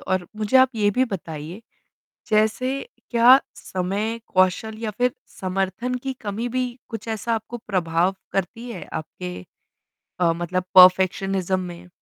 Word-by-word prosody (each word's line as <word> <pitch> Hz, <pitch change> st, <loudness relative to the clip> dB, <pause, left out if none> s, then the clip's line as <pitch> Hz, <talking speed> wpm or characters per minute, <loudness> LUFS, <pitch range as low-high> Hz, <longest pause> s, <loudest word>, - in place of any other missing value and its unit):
और 185 Hz, -2 st, -1 dB
मुझे 215 Hz, +3 st, +2 dB
आप 260 Hz, 0 st, +7 dB
ये 205 Hz, -2 st, +2 dB
भी 255 Hz, +6 st, +2 dB
बताइए 170 Hz, -, -6 dB, 0.7 s
जैसे 220 Hz, +5 st, +2 dB, 0.3 s
क्या 245 Hz, +3 st, +7 dB
समय, 200 Hz, +5 st, -3 dB
कौशल 185 Hz, +4 st, +1 dB
या 225 Hz, -1 st, -3 dB
फ़िर 245 Hz, +4 st, 0 dB, 0.3 s
समर्थन 195 Hz, +6 st, -2 dB
की 270 Hz, -1 st, -2 dB
कमी 215 Hz, +3 st, -3 dB
भी 250 Hz, 0 st, -2 dB
कुछ 225 Hz, 0 st, -7 dB
ऐसा 225 Hz, +1 st, -1 dB
आपको 225 Hz, +2 st, -5 dB
प्रभाव 180 Hz, -1 st, +1 dB, 0.2 s
करती 230 Hz, +6 st, -3 dB
है 195 Hz, -7 st, -7 dB
आपके 90 Hz, -, -6 dB, 0.9 s
अ, 170 Hz, -2 st, +4 dB
मतलब 175 Hz, +2 st, -2 dB
परफ़ेक्शनिज्म 185 Hz, 0 st, +5 dB
में? 180 Hz, 0 st, -8 dB
200 Hz, 135 wpm, -23 LUFS, 185-230 Hz, 0.9 s, आप